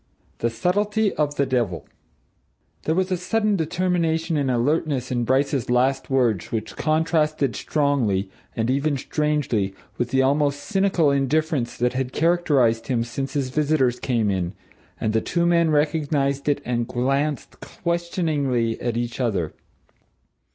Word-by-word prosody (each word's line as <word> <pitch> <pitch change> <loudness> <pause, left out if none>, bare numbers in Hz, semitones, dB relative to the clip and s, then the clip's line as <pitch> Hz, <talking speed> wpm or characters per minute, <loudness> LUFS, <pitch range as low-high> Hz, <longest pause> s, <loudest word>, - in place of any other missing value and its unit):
THE 115 - +1
SUBTLETY 205 - 0
OF 145 -1 -1
THE 140 - +2
DEVIL 120 -9 -1 1.0
There 160 - +1
was 185 +1 0
a 185 - +1
sudden 210 +4 +1
determination 165 -1 0
and 140 -3 +1
alertness 130 +1 0
in 120 -1 0
Bryce's 135 0 +1
last 130 +2 +1
words 120 -8 +1
which 110 -1 -3
contrasted 155 -5 +1
strongly, 120 -9 0 0.3
and 115 +2 0
even 140 +2 +1
strangely, 135 -9 -1 0.2
with 120 -1 0
the 130 +1 +2
almost 145 +1 +1
cynical 190 -7 +2
indifference 140 -1 0
that 125 0 +1
had 130 0 -2
characterized 150 -9 +2
him 120 -3 +1
since 135 +3 -4
his 140 -3 -1
visitors 145 -4 +1
came 115 -5 0
in, 90 -2 -2 0.5
and 110 - -1
the 110 - +2
two 170 0 0
men 170 -1 +3
recognized 145 -2 +1
it 145 0 +1
and 120 -1 -1
glanced 135 +4 -1
questioningly 155 -9 -1
at 120 -1 -1
each 120 +1 -3
other. 100 -11 -1
140 Hz, 140 wpm, -23 LUFS, 120-160 Hz, 1.0 s, men